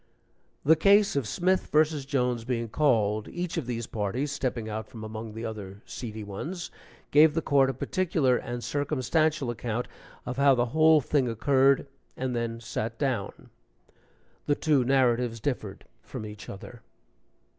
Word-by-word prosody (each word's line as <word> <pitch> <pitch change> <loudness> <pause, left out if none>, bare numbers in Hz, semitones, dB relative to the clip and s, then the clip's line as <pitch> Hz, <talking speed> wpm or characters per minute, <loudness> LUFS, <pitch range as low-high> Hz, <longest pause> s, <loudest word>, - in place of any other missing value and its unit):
The 160 +3 +7
case 200 +4 +4
of 135 -6 0
Smith 185 - +1
vs. 150 -2 +2
Jones 125 -4 0
being 115 -1 -2
called, 110 -6 +1
each 175 -1 -4
of 160 -8 -3
these 120 -2 -3
parties 115 +8 -2
(stepping 125 -5 -2
out 110 0 -4
from 110 -2 -10
among 110 0 -7
the 115 +1 -5
other 105 -2 -7
seedy 110 -3 -6
ones) 155 - -6 0.4
gave 155 +1 +6
the 165 - +1
court 135 -2 +3
a - - -1
particular 155 -3 +1
and 120 0 -4
circumstantial 145 -1 0
account 120 0 -3 0.4
of 125 0 -4
how 140 -1 +5
the 120 -1 +2
whole 160 -1 +6
thing 130 -1 +1
occurred, 135 +4 +3 0.3
and 130 -1 -2
then 115 -1 -2
sat 115 0 -4
down. 130 -8 -3 1.0
The 145 - +3
two 145 -4 +2
narratives 125 -3 +2
differed 110 -6 -4 0.2
from 110 - -7
each 105 -2 -9
other. 115 +4 -10
125 Hz, 155 wpm, -27 LUFS, 115-145 Hz, 1.0 s, The